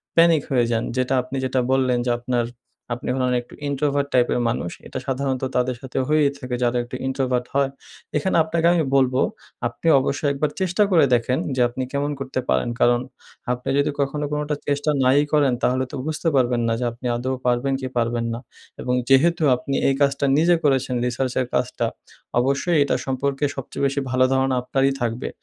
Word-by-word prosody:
Panic 165 Hz, -2 st, +5 dB
হয়ে 120 Hz, -3 st, +3 dB
যান। 115 Hz, 0 st, +1 dB
যেটা 130 Hz, +1 st, +1 dB
আপনি 130 Hz, +2 st, -8 dB
যেটা 130 Hz, 0 st, 0 dB
বললেন 130 Hz, -2 st, +2 dB
যে, 120 Hz, -, +1 dB
আপনার 120 Hz, -1 st, -1 dB, 0.5 s
আপনি 125 Hz, -, -5 dB
হলেন 125 Hz, -1 st, +1 dB
একটু 120 Hz, -, -18 dB
ইন্ট্রোভার্ট 140 Hz, 0 st, 0 dB
টাইপ 125 Hz, -1 st, +4 dB
এর 125 Hz, -, +1 dB
মানুষ। 85 Hz, -7 st, -2 dB, 0.2 s
এটা -, -, -5 dB
সাধারণত 135 Hz, 0 st, -1 dB
তাদের 125 Hz, 0 st, +1 dB
সাথে 130 Hz, -1 st, -7 dB
হয়েই 150 Hz, -2 st, +3 dB
থাকে 125 Hz, -2 st, -4 dB
যারা 120 Hz, 0 st, +1 dB
একটু 120 Hz, +1 st, -8 dB
ইন্ট্রোভার্ট 130 Hz, -2 st, 0 dB
হয়। 140 Hz, -1 st, +3 dB, 0.5 s
এখানে 190 Hz, +6 st, 0 dB
আপনাকে 165 Hz, +1 st, +1 dB
আমি 165 Hz, -2 st, +2 dB
বলবো 130 Hz, -1 st, +3 dB, 0.5 s
আপনি 120 Hz, +7 st, -6 dB
অবশ্যই 140 Hz, +2 st, -1 dB
একবার 145 Hz, +2 st, 0 dB
চেষ্টা 185 Hz, +3 st, +2 dB
করে 165 Hz, -6 st, +6 dB
দেখেন 125 Hz, +2 st, +1 dB, 0.2 s
যে 125 Hz, -, +1 dB
আপনি 130 Hz, +2 st, -4 dB
কেমন 145 Hz, +1 st, 0 dB
করতে 130 Hz, -1 st, -3 dB
পারেন। 65 Hz, -, +1 dB
কারণ 120 Hz, 0 st, +4 dB, 0.5 s
আপনি 125 Hz, +2 st, -3 dB
যোদি 145 Hz, -, +2 dB
কখনো 145 Hz, +2 st, -1 dB
কোনটা 150 Hz, 0 st, -1 dB
চেষ্টা 145 Hz, +1 st, 0 dB
নাই 130 Hz, +2 st, +4 dB
ই -, -, -3 dB
করেন 145 Hz, -4 st, +4 dB
তাহলে 130 Hz, +1 st, +2 dB
তো -, -, -5 dB
বুঝতে 155 Hz, +2 st, -2 dB
পারবেন 120 Hz, -2 st, +2 dB
না। 115 Hz, -, +1 dB
যে 125 Hz, -, -1 dB
আপনি 120 Hz, +2 st, -12 dB
আদৌ 130 Hz, +2 st, -2 dB
পারবেন 125 Hz, +3 st, +1 dB
কি 130 Hz, -, -3 dB
পারবেন 115 Hz, 0 st, 0 dB
না। 115 Hz, -, -4 dB, 0.4 s
এবং 125 Hz, -, -1 dB, 0.2 s
যেহেতু 160 Hz, +5 st, +4 dB
আপনি 135 Hz, +2 st, -4 dB
এই 135 Hz, -, +3 dB
কাজটা 140 Hz, 0 st, +2 dB
নিজে 170 Hz, +2 st, +4 dB
করেছেন 135 Hz, -3 st, +1 dB
রিসার্চের 125 Hz, +1 st, -1 dB
কাজটা -, -, 0 dB, 0.5 s
অবশ্যই 140 Hz, +6 st, +1 dB
এটা 140 Hz, -, 0 dB
সম্পর্কে 135 Hz, +2 st, -2 dB
সবচেয়ে 135 Hz, +1 st, -5 dB
বেশি 140 Hz, +1 st, 0 dB
ভালো 130 Hz, 0 st, +3 dB
ধারণা 130 Hz, 0 st, +2 dB
আপনারই 135 Hz, +2 st, +1 dB
থাকবে। 120 Hz, +1 st, -2 dB
130 Hz, 190 wpm, -22 LUFS, 125-140 Hz, 0.5 s, করে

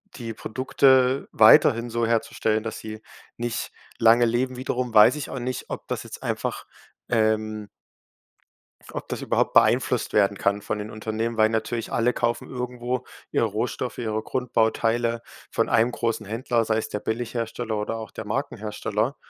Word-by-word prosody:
die 115 Hz, -2 st, -6 dB
Produkte 130 Hz, +3 st, +2 dB
weiterhin 115 Hz, +2 st, +6 dB
so 115 Hz, 0 st, 0 dB
herzustellen, 110 Hz, -1 st, 0 dB
dass 110 Hz, -1 st, -5 dB
sie 110 Hz, 0 st, -8 dB, 0.3 s
nicht 120 Hz, 0 st, -3 dB, 0.3 s
lange 115 Hz, +1 st, +6 dB
leben. 125 Hz, +2 st, 0 dB
Wiederum 125 Hz, -1 st, -2 dB
weiß 105 Hz, +6 st, +7 dB
ich 150 Hz, -, -5 dB
auch 130 Hz, -, -5 dB
nicht, 125 Hz, +1 st, -4 dB
ob -, -, -6 dB
das -, -, -3 dB
jetzt -, -, -10 dB
einfach, -, -, -3 dB, 0.4 s
ähm 110 Hz, -2 st, 0 dB, 1.1 s
f -, -, -15 dB
ob -, -, -5 dB
das -, -, -4 dB
überhaupt -, -, 0 dB
beeinflusst -, -, +3 dB
werden 100 Hz, -1 st, +3 dB
kann 100 Hz, 0 st, 0 dB
von 110 Hz, -, -3 dB
den 105 Hz, +1 st, -6 dB
Unternehmen, 110 Hz, +1 st, -3 dB
weil 110 Hz, 0 st, +5 dB
natürlich 115 Hz, +1 st, -2 dB
alle 120 Hz, +1 st, +2 dB
kaufen 120 Hz, 0 st, -1 dB
irgendwo 125 Hz, 0 st, -3 dB, 0.3 s
ihre -, -, +2 dB
Rohstoffe, -, -, -3 dB
ihre 110 Hz, -2 st, -2 dB
Grundbauteile 115 Hz, -1 st, 0 dB, 0.3 s
von -, -, 0 dB
einem 115 Hz, +2 st, +3 dB
großen 115 Hz, -1 st, -2 dB
Händler, 115 Hz, +2 st, 0 dB
sei 110 Hz, 0 st, +1 dB
es 110 Hz, -, -3 dB
der 105 Hz, -, -3 dB
Billighersteller 115 Hz, 0 st, -3 dB
oder 105 Hz, +2 st, -2 dB
auch 110 Hz, -1 st, -7 dB
der 110 Hz, -, -7 dB
Markenhersteller. 110 Hz, 0 st, -2 dB
115 Hz, 160 wpm, -25 LUFS, 110-120 Hz, 1.1 s, weiß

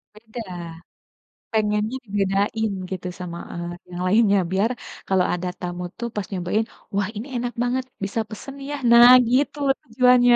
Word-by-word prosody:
Beda. 225 Hz, +2 st, -8 dB, 1.1 s
Pengennya 215 Hz, +2 st, +1 dB
dibedain 205 Hz, +2 st, 0 dB, 0.2 s
gitu 185 Hz, -1 st, -4 dB
sama, 170 Hz, -1 st, -5 dB, 0.2 s
eee, 170 Hz, 0 st, -4 dB, 0.2 s
yang 175 Hz, 0 st, -5 dB
lainnya 205 Hz, 0 st, +4 dB
biar 200 Hz, +5 st, +2 dB, 0.4 s
kalau 190 Hz, -2 st, +3 dB
ada 180 Hz, +1 st, -2 dB
tamu 180 Hz, 0 st, -4 dB
tuh 235 Hz, -, -3 dB
pas 210 Hz, -, -2 dB
nyobain, 195 Hz, +4 st, 0 dB, 0.3 s
"Wah, 200 Hz, -1 st, +1 dB
ini 235 Hz, +6 st, -5 dB
enak 245 Hz, 0 st, -2 dB
banget, 255 Hz, +1 st, 0 dB, 0.2 s
bisa 200 Hz, +3 st, -2 dB
pesen, 270 Hz, +6 st, -8 dB
ya, 290 Hz, -, -2 dB, 0.2 s
"Nah, 240 Hz, +1 st, +10 dB, 0.2 s
gitu 280 Hz, +3 st, +2 dB, 0.2 s
tujuannya. 245 Hz, 0 st, +5 dB
215 Hz, 145 wpm, -23 LUFS, 190-240 Hz, 1.1 s, Nah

